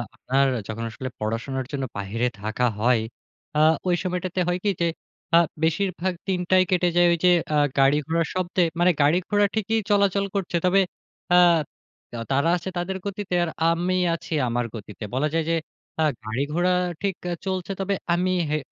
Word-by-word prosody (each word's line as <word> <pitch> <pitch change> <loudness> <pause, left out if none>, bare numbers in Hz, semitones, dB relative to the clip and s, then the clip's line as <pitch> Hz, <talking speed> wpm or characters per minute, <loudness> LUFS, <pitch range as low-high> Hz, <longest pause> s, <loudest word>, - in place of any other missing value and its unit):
আপনার 135 +1 +1 0.2
যখন 110 +1 -5
আসলে 130 +2 -6
পড়াশোনার 120 +5 -3
জন্য 140 -2 -3
বাহিরে 110 +5 -1
থাকা 110 +4 -1
হ, - - -9 0.2
য় - - -1 0.6
আ - - +3 0.3
ওই 175 - +3
সময়টাতে 185 0 -2
হয় 175 +1 0
কি? 205 - +2
যে, 170 - +3 0.5
আ - - +9 0.3
বেশিরভাগ 185 +2 0
দিনটাই 185 0 +3
কেটে 180 -1 +3
যায় 175 0 +5
ওইযে 180 +2 +3 0.2
আ - - +4 0.2
গাড়ি-ঘোড়ার 150 +4 +2
শব্দে। 185 0 0 0.2
মানে 180 +1 +5
গাড়ি-ঘোড়া 180 +7 +3
ঠিকই 220 +1 +1
চলাচল 200 -1 +3
করছে। 185 -3 -1
তবে 190 +2 +4 0.5
আ - - +7 0.7
তা 120 - -6
তারা 140 +5 +2
আছে 180 - -6
তাদের 190 +2 -2
গতিতে 200 -2 -3
আর 170 - -1 0.2
আমি 175 +2 0 0.2
আছি 165 - -5
আমার 120 0 -1
গতিতে। 105 0 -9
বলা 135 +4 +1
যায় 165 -1 +1
যে, 165 - +2 0.5
আ - - +4 0.2
গাড়ি 110 +5 -2 0.6
-ঠিক 200 -2 -1 0.2
আ - - 0
চলছে। 185 -1 -2
তবে 200 +1 0 0.2
আমি 180 +1 +1 0.2
হে 155 - +1
175 Hz, 165 wpm, -24 LUFS, 135-185 Hz, 0.7 s, আ